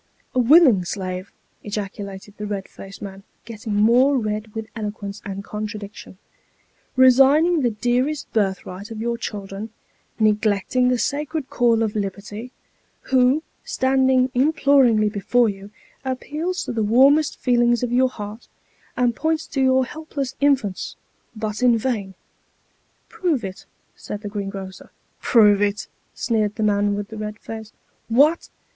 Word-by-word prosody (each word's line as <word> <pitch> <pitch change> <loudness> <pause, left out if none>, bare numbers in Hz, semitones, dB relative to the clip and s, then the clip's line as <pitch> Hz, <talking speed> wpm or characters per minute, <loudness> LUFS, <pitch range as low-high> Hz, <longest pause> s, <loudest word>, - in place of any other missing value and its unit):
" - - -39
A 255 - +1
willing 250 - +6
slave," 185 0 -5 0.3
ejaculated 200 -1 -6
the 210 - -5
red 200 -2 -4
faced 195 +1 -11
man, 195 -1 -8 0.2
getting 215 -1 -5
more 245 +7 +4
red 215 -1 -3
with 220 0 -4
eloquence, 205 -2 -5
and 195 -1 -6
contradiction 210 -2 -7 0.4
" - - -40
resigning 290 +6 +5
the 245 - +2
dearest 245 +6 -1
birthright 195 -1 -2
of 225 -1 -7
your 235 +1 -1
children 205 -2 -6 0.5
neglecting 215 +3 +2
the 250 - +2
sacred 295 +2 -2
call 230 -2 +3
of 215 -1 -2
Liberty 205 +4 -5 0.6
who, 260 +4 +4 0.2
standing 260 -1 +2
imploringly 265 -5 +4
before 220 +3 +2
you, 195 0 -8 0.3
appeals 300 +7 -3
to - - -4
the 230 -2 -1
warmest 270 +8 +4
feelings 240 -1 +2
of 245 - -1
your 255 +1 +3
heart, 210 0 -8 0.5
and 245 -2 +2
points 320 0 -1
to 270 - -3
your 260 0 +3
helpless 285 -2 -5
infants, 265 -10 +1 0.4
but 215 0 -4
in 245 -2 +4
vain." 215 -6 -3 0.5
" - - -42
Prove 320 -10 -1
it," 190 0 -8 0.3
said 210 - -7
the 205 - -5
greengrocer. 195 -2 -6 0.2
" - - -42
Prove 210 -4 +5
it! 205 0 0 0.2
" - - -42
sneered 215 -3 0
the 220 - -2
man 205 -1 +2
with 205 0 -5
the 220 - -8
red 210 0 -5
face. 220 -1 -8 0.2
" - - -42
What 310 +4 +4
225 Hz, 150 wpm, -22 LUFS, 205-260 Hz, 0.6 s, willing